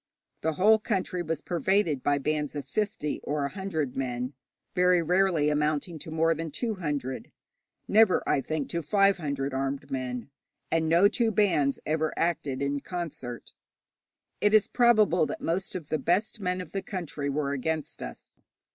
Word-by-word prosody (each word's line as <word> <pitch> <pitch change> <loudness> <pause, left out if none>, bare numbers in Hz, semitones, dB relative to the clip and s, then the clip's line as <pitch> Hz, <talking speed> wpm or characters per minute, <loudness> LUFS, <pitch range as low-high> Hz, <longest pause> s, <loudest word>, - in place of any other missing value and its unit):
The 160 0 0
whole 215 +7 +5
country 190 -4 -1
was 165 -1 -3
pervaded 175 -3 +1
by 145 +2 +2
bands 150 +1 -1
of 140 -2 -5
fifty 200 -3 -2
or 145 -1 -1
a - - -2
hundred 160 -8 -3
men, 125 0 -2 0.4
very 180 -1 +4
rarely 175 -2 +2
amounting 150 +2 0
to 160 - -8
more 160 +1 +2
than 165 0 -4
two 225 - -2
hundred, 145 -8 -4 0.6
never, 215 -2 +4
I 135 - +2
think, 155 0 -3
to 170 - -2
five 195 +5 +3
hundred, 140 -4 -3
armed 135 +1 -3
men, 130 0 -4 0.4
and 160 -1 +1
no 170 +5 +6
two 230 +2 +1
bands 180 -10 +2
ever 155 0 0
acted 145 -5 0
in 140 0 0
concert. 140 -8 -6 0.9
It 205 +1 +4
is 215 - +5
probable 215 -9 +4
that - - -5
most 180 +4 -2
of 165 -5 -6
the 155 - 0
best 195 - 0
men 180 -2 -1
of 180 - -10
the 195 - -2
country 160 -8 -4
were 140 0 -1
against 155 +3 -3
us. - - -9
160 Hz, 165 wpm, -28 LUFS, 140-185 Hz, 0.9 s, no